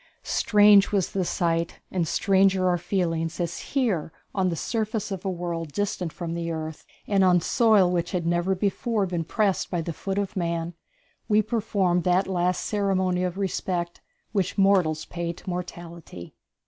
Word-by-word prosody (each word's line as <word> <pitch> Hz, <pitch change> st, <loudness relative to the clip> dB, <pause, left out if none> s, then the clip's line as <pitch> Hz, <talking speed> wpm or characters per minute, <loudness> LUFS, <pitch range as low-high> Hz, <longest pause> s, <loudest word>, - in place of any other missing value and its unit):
Strange 205 Hz, -1 st, +5 dB
was 195 Hz, -4 st, 0 dB
the 190 Hz, -, 0 dB
sight, 170 Hz, -1 st, -1 dB
and 175 Hz, -3 st, 0 dB
stranger 190 Hz, +1 st, +3 dB
our 180 Hz, -1 st, +2 dB
feelings, 165 Hz, -3 st, -1 dB
as 170 Hz, -1 st, -2 dB
here 215 Hz, -, -1 dB, 0.2 s
on 190 Hz, -2 st, +1 dB
the 170 Hz, -, -2 dB
surface 215 Hz, +2 st, -2 dB
of 190 Hz, -2 st, -4 dB
a 195 Hz, -, -1 dB
world 170 Hz, -3 st, -4 dB
distant 190 Hz, -4 st, -2 dB
from 170 Hz, 0 st, -5 dB
the 170 Hz, 0 st, -3 dB
earth, 160 Hz, -1 st, -5 dB, 0.2 s
and 200 Hz, -2 st, +2 dB
on 180 Hz, -1 st, +5 dB
soil 215 Hz, +1 st, +4 dB
which 175 Hz, -2 st, -1 dB
had 180 Hz, -3 st, -2 dB
never 175 Hz, +3 st, +1 dB
before 205 Hz, +2 st, 0 dB
been 175 Hz, -3 st, -2 dB
pressed 200 Hz, +3 st, 0 dB
by 175 Hz, -, -1 dB
the 165 Hz, 0 st, -3 dB
foot 195 Hz, +4 st, -4 dB
of 200 Hz, -1 st, -2 dB
man, 170 Hz, -1 st, -2 dB, 0.6 s
we 210 Hz, 0 st, +5 dB
performed 200 Hz, -5 st, 0 dB
that 180 Hz, +1 st, +2 dB
last 180 Hz, -1 st, 0 dB
ceremony 190 Hz, -3 st, 0 dB
of 180 Hz, 0 st, -2 dB
respect 180 Hz, -3 st, -2 dB, 0.3 s
which 195 Hz, -3 st, -1 dB
mortals 185 Hz, -6 st, +3 dB
pay 170 Hz, -1 st, -4 dB
to 175 Hz, -, -17 dB
mortality. 170 Hz, -, -7 dB
180 Hz, 165 wpm, -25 LUFS, 170-195 Hz, 0.6 s, Strange